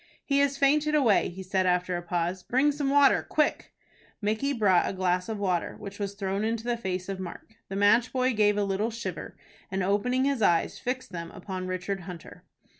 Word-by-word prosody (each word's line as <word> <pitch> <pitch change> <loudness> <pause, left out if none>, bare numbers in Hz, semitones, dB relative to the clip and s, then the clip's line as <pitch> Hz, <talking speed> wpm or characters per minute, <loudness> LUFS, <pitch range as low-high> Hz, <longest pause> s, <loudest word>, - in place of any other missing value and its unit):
"He 280 -1 +2
has 280 -1 +2
fainted 300 +2 +3
away," 245 -9 +3
he 190 +2 -8
said, 185 0 0
after 180 0 +1
a 175 - -3
pause. 175 +1 -2
"Bring 260 +10 +2
some 285 -1 -2
water, 280 0 +5
quick!" 305 -1 0 0.5
Micky 220 +7 0
brought 205 -9 +3
a - - -4
glass 180 0 0
of 220 - -3
water, 185 -4 -1
which 200 0 -9
was 200 -1 -3
thrown 195 0 -2
in 225 +1 +1
the 235 +1 -2
face 185 -5 -4
of 195 -1 -4
Mark. 185 +4 -8 0.2
The 195 - -5
match 220 +5 +4
boy 255 0 +1
gave 210 -1 +3
a 205 - +2
little 200 +3 0
shiver, 220 -6 -6 0.3
and, 190 0 -1
opening 250 +7 +1
his 275 -4 0
eyes, 170 -5 +2
fixed 255 +1 -4
them 170 -1 -6
upon 185 -1 -6
Richard 185 +2 -3
Hunter. 175 -2 -10
200 Hz, 200 wpm, -27 LUFS, 185-250 Hz, 0.5 s, water